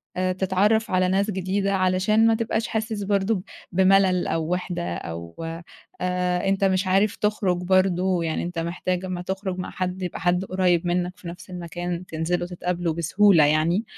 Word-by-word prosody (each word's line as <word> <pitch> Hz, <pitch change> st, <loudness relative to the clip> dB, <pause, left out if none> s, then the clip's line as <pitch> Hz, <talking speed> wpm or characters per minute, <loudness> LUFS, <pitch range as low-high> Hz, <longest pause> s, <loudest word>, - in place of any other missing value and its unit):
آآ، 185 Hz, 0 st, 0 dB
تتعرّف 195 Hz, +4 st, +1 dB
على 185 Hz, 0 st, +3 dB
ناس 195 Hz, +3 st, +1 dB
جديدة 195 Hz, +1 st, -1 dB
علشان 190 Hz, +4 st, +3 dB
ما 225 Hz, -, +4 dB
تبقاش 220 Hz, 0 st, -1 dB
حاسس 220 Hz, -2 st, -2 dB
برضه 200 Hz, +2 st, +1 dB
ب 185 Hz, -, -5 dB, 0.3 s
بمَلَل 190 Hz, 0 st, +3 dB
أو 160 Hz, -1 st, -1 dB
وِحدة 175 Hz, -, -3 dB
أو 85 Hz, 0 st, -7 dB, 0.7 s
آآ، 180 Hz, 0 st, 0 dB
أنت 195 Hz, 0 st, 0 dB
مش 190 Hz, 0 st, +2 dB
عارف 195 Hz, +3 st, +2 dB
تخرُج 210 Hz, -4 st, 0 dB
برضه، 185 Hz, -1 st, +2 dB
يعني 160 Hz, -1 st, -2 dB
أنت 175 Hz, -1 st, -4 dB
محتاج 175 Hz, +2 st, -2 dB
أمّا 180 Hz, -1 st, -4 dB
تخرُج 190 Hz, 0 st, -4 dB
مع 180 Hz, -, -4 dB
حد 185 Hz, 0 st, -3 dB
يبقى 180 Hz, -2 st, -4 dB
حد 180 Hz, +2 st, +1 dB
قريّب 180 Hz, -2 st, +1 dB
منّك 180 Hz, +1 st, -1 dB
في -, -, -11 dB
نَفْس 175 Hz, +2 st, -9 dB
المكان 175 Hz, 0 st, -5 dB
تنزلوا 170 Hz, +2 st, -2 dB
تتقابلوا 175 Hz, -2 st, -2 dB
بسهولة 170 Hz, 0 st, +4 dB
يعني، 155 Hz, +7 st, +2 dB
185 Hz, 165 wpm, -24 LUFS, 175-195 Hz, 0.7 s, ما